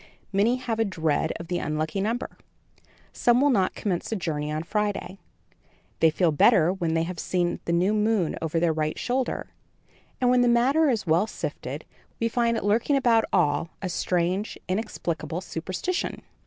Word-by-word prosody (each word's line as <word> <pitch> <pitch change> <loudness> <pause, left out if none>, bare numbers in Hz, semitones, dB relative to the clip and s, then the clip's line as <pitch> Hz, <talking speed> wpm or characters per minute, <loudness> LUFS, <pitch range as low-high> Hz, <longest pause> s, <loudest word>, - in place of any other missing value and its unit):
Many 210 +5 +3
have 245 -3 -3
a - - +4
dread 160 -6 0
of 170 - -8
the 175 0 -1
unlucky 155 +5 -2
number; 230 +5 -2 0.8
some 240 0 +3
will 285 +1 +4
not 195 -6 +1
commence 185 -2 -2
a - - 0
journey 150 -5 -2
on 155 +1 -2
Friday; 205 0 -2 0.8
they 160 - +6
feel 165 +1 +2
better 160 +3 +4
when 170 -4 -1
they 165 - +2
have 175 0 -5
seen 175 -1 -1
the - - -1
new 180 +5 +2
moon 210 -5 +1
over 160 0 0
their 165 -1 +2
right 155 0 -2
shoulder, 255 +1 -2 0.7
and 250 -1 +3
when 250 0 +4
the 245 - +4
matter 265 +6 +4
is 230 -6 0
well 170 +5 +3
sifted, - - -5 0.3
we 230 - +1
find 230 -1 +1
lurking 225 +7 +2
about 235 -4 +3
all 150 +3 +2
a 190 - -4
strange, 180 +3 -1
inexplicable 175 -5 -3
superstition. 185 - -3
190 Hz, 170 wpm, -26 LUFS, 165-230 Hz, 0.8 s, they